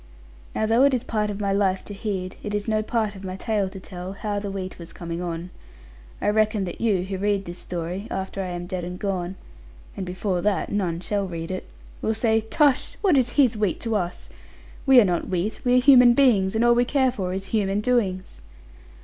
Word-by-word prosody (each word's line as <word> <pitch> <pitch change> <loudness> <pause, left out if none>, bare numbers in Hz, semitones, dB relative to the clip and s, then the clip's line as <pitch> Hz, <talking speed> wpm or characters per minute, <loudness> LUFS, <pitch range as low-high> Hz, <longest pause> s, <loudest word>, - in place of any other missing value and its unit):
Now 220 - +1
though 225 +3 +3
it 275 -1 +5
is 245 - -2
part 210 -2 -1
of 205 0 -4
my 200 -1 0
life 195 -1 +1
to 205 - -7
heed, 195 -3 -4
it 205 0 -3
is 205 +1 -2
no 215 -1 +1
part 215 -1 -1
of 190 - -10
my 185 -1 -5
tale 205 -1 -1
to 190 0 -9
tell, 185 0 -7
how 205 0 -3
the 200 0 -4
wheat 190 -2 -5
was 170 -1 -9
coming 170 0 -5
on. 175 0 -4 0.7
I - - +1
reckon 215 -1 +2
that 175 -2 -6
you, 205 -6 +2
who 190 0 -4
read 200 -1 0
this 175 +1 -7
story, 180 +4 -5
after 190 +1 -3
I 190 - -3
am 175 -1 -5
dead 180 0 -4
and 180 +1 -5
gone 185 -2 -2 0.6
(and 195 - -4
before 180 0 -2
that 205 0 0
none 175 -5 -1
shall 200 0 -1
read 165 -1 -5
it), 185 - -5 0.3
will 220 - 0
say, 225 0 +2
'Tush! 270 +5 +2
What 375 -7 +4
is 255 -3 +3
his 255 -6 +5
wheat 210 -4 0
to 225 -1 -1
us? 180 -3 -3 0.6
We 265 -2 +8
are 225 - +6
not 175 -2 -1
wheat: 185 +4 -2
we 245 0 +3
are - - +5
human 250 -3 +7
beings: 220 -8 +4
and 225 +2 +3
all 240 - +6
we 240 +1 +3
care 260 0 +2
for 190 -7 -3
is 190 +1 -3
human 200 -2 +1
doings.' 200 - -1
200 Hz, 225 wpm, -24 LUFS, 185-220 Hz, 0.7 s, We